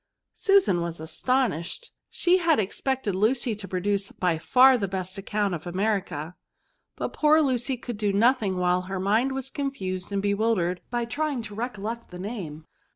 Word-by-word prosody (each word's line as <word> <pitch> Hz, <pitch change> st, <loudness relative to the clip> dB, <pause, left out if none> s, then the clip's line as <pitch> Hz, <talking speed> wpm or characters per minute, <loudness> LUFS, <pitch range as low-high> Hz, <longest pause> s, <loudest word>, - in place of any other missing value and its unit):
Susan 390 Hz, -, +3 dB
was 170 Hz, -1 st, -4 dB
astonished; 245 Hz, -, -1 dB, 0.2 s
she 360 Hz, +1 st, +3 dB
had 335 Hz, -5 st, +3 dB
expected 220 Hz, +2 st, -1 dB
V£RBS. -, -, -2 dB
243 215 Hz, -, +6 dB
Lucy 240 Hz, -3 st, -1 dB
to 200 Hz, -1 st, -9 dB
produce 195 Hz, +2 st, -1 dB
by 175 Hz, -3 st, 0 dB
far 255 Hz, +10 st, +6 dB
the 205 Hz, -5 st, -1 dB
best 185 Hz, -1 st, -4 dB
account 205 Hz, 0 st, -1 dB
of 175 Hz, +1 st, -5 dB
America, 180 Hz, -4 st, -2 dB, 0.6 s
but -, -, -4 dB
poor 305 Hz, +1 st, +4 dB
Lucy 260 Hz, -3 st, 0 dB
could 240 Hz, -2 st, -6 dB
do 205 Hz, -2 st, +1 dB
nothing 210 Hz, -2 st, +2 dB
while 180 Hz, 0 st, +2 dB
her 190 Hz, 0 st, -2 dB
mind 220 Hz, +8 st, +2 dB
was 270 Hz, 0 st, -4 dB
confused 195 Hz, -11 st, -3 dB
and 200 Hz, 0 st, -1 dB
bewildered 200 Hz, -4 st, +1 dB
by 240 Hz, -1 st, -1 dB
trying 285 Hz, 0 st, -2 dB
to 210 Hz, -2 st, -8 dB
recollect 230 Hz, 0 st, -5 dB
the 180 Hz, -, -9 dB
name. 180 Hz, -6 st, -6 dB
210 Hz, 170 wpm, -26 LUFS, 185-255 Hz, 0.6 s, 243